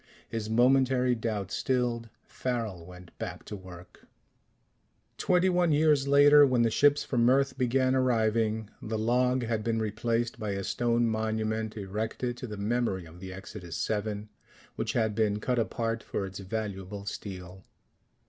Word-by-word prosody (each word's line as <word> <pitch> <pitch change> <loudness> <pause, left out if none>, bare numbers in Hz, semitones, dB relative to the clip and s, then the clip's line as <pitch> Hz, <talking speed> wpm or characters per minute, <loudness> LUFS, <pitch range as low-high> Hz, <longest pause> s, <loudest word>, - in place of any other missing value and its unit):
His 110 -2 -4
momentary 125 +1 +3
doubt 110 -4 -3
stilled, 120 -3 -1 0.2
Farrel 110 -9 -4
went 90 -1 -13
back 90 -5 -6
to 105 - -6
work. 90 -2 -13 1.1
Twenty 180 0 +3
one 180 -2 +2
years 150 -2 +3
later, 145 +1 +7
when 130 -4 +3
the 115 - +2
ships 145 +5 +4
from 120 -2 +2
Earth 135 0 +2
began 130 0 +2
arriving, 110 -4 +1
the 110 0 -3
log 125 +3 +2
had 110 -2 -1
been 115 0 0
replaced 115 +2 -1
by 105 -3 -2
a 100 0 -3
stone 120 +3 +1
monument 110 0 -1
erected 110 +5 -3
to 125 - -6
the 105 -2 -7
memory 105 -3 -1
of 85 +2 -13
the 95 0 -8
Exodus 95 -2 -6
VII, 105 -1 -2 0.5
which - - -2
had 110 -2 +1
been 105 -1 +1
cut 125 +3 0
apart 115 0 -1
for 100 - -3
its 95 0 -8
valuable 100 -1 -5
steel. 95 -2 -7
110 Hz, 150 wpm, -29 LUFS, 105-125 Hz, 1.1 s, later